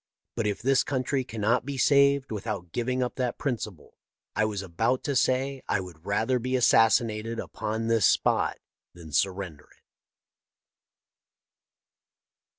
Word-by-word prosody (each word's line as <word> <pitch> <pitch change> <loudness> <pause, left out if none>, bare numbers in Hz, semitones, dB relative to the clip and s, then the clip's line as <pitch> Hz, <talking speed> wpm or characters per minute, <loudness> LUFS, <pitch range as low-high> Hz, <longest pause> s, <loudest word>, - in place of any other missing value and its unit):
But 115 -3 -1
if 105 +1 -3
this 135 +1 +3
country 130 0 -1
cannot 115 +1 0
be 140 +1 -5
saved 140 -1 +4
without 100 -5 -4
giving 125 +4 -1
up 125 - -4
that 125 -2 -1
principle, 110 - -5 0.4
I 110 - +2
was 105 -2 -3
about 115 +8 0
to 140 - -1
say 130 +1 +1
I - - +2
would 90 -2 -10
rather 110 +5 +1
be 130 +2 -2
assassinated 115 -2 +3
upon 110 +1 -4
this 115 -4 +3
spot - - +2 0.4
than 85 -3 -11
surrender 90 -3 -1
it." - - -27
115 Hz, 135 wpm, -27 LUFS, 100-130 Hz, 0.4 s, saved